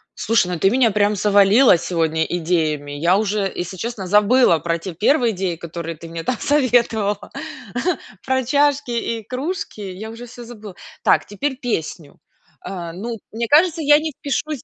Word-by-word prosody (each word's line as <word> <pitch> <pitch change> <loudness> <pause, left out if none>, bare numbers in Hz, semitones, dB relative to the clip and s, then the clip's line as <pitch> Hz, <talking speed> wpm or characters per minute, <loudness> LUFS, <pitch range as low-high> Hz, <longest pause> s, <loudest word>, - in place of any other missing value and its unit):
Слушай, 225 -5 +1
ну, - - -2
ты 195 - +4
меня, 240 -1 +3
прям, 205 0 +2
завалила 205 +2 +5
сегодня 160 -2 0
идеями. 155 -4 -1
Я 170 +6 +2
уже, 205 -2 -1
если 175 +2 -5
честно, 220 -3 -5
забыла 210 -2 +4
про 170 +2 -1
те 180 +1 -7
1 235 - +2
идеи, 185 -3 -3
которые 165 -1 -6
ты 165 +2 -10
мне, 165 0 -6
там, 250 +3 -1
советовала 235 -7 +1 1.0
про 260 -1 0
чашки 285 -1 +1
и 230 -1 -2
кружки. 275 - -4
Я 195 +3 -7
уже 230 +2 -9
всё 240 0 -11
забыла. 215 -5 -11 0.3
Так, - - +3
теперь 265 +6 -3
песню. 170 - -4 0.4
А, 170 -3 -6
ну, 225 +5 -5 0.2
мне 230 +1 -2
кажется, 325 +2 +4
я 295 0 +6
не 315 0 -3
впишусь 290 -1 -3
210 Hz, 165 wpm, -20 LUFS, 175-250 Hz, 1.0 s, я